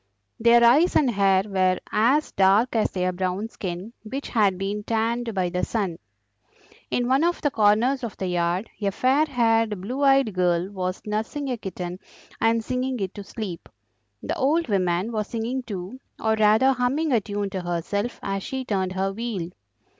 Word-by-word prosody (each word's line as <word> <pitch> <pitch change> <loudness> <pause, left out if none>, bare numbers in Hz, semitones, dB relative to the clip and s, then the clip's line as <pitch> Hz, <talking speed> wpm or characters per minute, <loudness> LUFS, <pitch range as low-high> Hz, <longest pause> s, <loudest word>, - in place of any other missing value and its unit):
Their 235 +1 +5
eyes 285 +10 +5
and 270 -5 +4
hair 195 -2 +3
were 185 -3 +1
as 260 +8 +2
dark 200 +6 +3
as 220 - +2
their 185 -1 -1
brown 185 +4 -2
skin, 185 +2 -6
which 265 +6 -6
had 205 -5 +2
been 200 +2 -3
tanned 230 +2 -1
by 185 -2 0
the 180 0 -2
sun. 195 -7 -2 0.9
In 245 0 0
one 265 +4 +3
of 345 +1 +1
the 290 - +1
corners 225 +5 +3
of 230 - -5
the 190 - -3
yard 180 +3 0
a 200 - +1
fair 260 +9 +2
haired, 225 -5 +1
blue 245 +9 -4
eyed 270 -5 +4
girl 180 0 +1
was 185 -1 -4
nursing 225 +7 -3
a 245 - -2
kitten 180 -3 -6 0.4
and 225 0 +2
singing 255 +1 -2
it 195 -1 -3
to 205 - -8
sleep. 195 -5 -7 0.5
The - - -2
old 310 +3 +1
woman 185 +1 0
was 215 -2 -2
singing 235 +3 -3
too, 200 +1 -7 0.2
or 220 0 +1
rather 220 +5 +4
humming 265 +5 0
a 235 -4 +3
tune 205 -1 -3
to 190 -2 -3
herself 180 +6 -3
as 195 0 -2
she 265 +5 -4
turned 190 -5 -1
her 195 +1 -1
wheel. 200 -6 -4
215 Hz, 175 wpm, -24 LUFS, 190-245 Hz, 0.9 s, Their